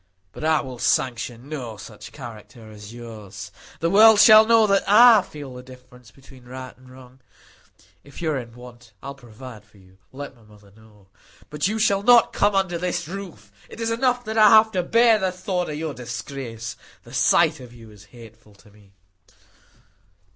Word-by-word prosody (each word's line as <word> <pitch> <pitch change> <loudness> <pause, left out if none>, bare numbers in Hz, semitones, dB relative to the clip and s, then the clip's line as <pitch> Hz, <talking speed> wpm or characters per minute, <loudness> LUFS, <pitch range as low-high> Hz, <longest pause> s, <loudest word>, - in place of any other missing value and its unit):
But - - -10
I 160 0 +1
will 130 -3 -10
sanction 120 0 -2
no 125 -8 -7
such 105 +1 -12
character 115 -3 -12
as 105 0 -12
yours; 110 -4 -11 0.3
the 165 - 0
world 215 +1 +6
shall 215 0 +7
know 225 -1 +4
that 195 -1 +1
I 225 +1 +7
feel 145 -6 -11
the 125 - -10
difference 125 -1 -17
between 135 -2 -19
right 130 +1 -10
and 130 0 -20
wrong. 130 0 -17 0.8
If 140 - -14
you 160 -2 -2
are 140 - -2
in 120 -2 -11
want, 120 -3 -15
I - - -7
will - - -7
provide 120 -3 -13
for 105 0 -25
you; 95 0 -23
let 140 0 -9
my 120 - -24
mother 105 -2 -21
know. 105 -3 -22 0.4
But 150 +1 -2
you 215 +2 -3
shall 200 -2 +1
not 235 +2 +4
come 205 0 +1
under 185 -3 -1
my 180 +1 -2 0.2
roof. 185 - -10 0.2
It - - -13
is 230 0 -2
enough 245 +1 -1
that 220 +1 -2
I 215 -1 +7
have 220 +1 +5
to 185 - -1
bear 230 +4 +3
the 190 -2 -1
thought 180 -1 -4
of 150 - -5
your 155 -1 -5
disgrace; 120 -1 -8 0.3
the - - -16
sight - - +2
of 125 -2 -13
you 115 -2 -15
is 105 0 -17
hateful 110 -2 -17
to 105 +1 -22
me." 100 -1 -23
130 Hz, 190 wpm, -22 LUFS, 115-190 Hz, 0.8 s, shall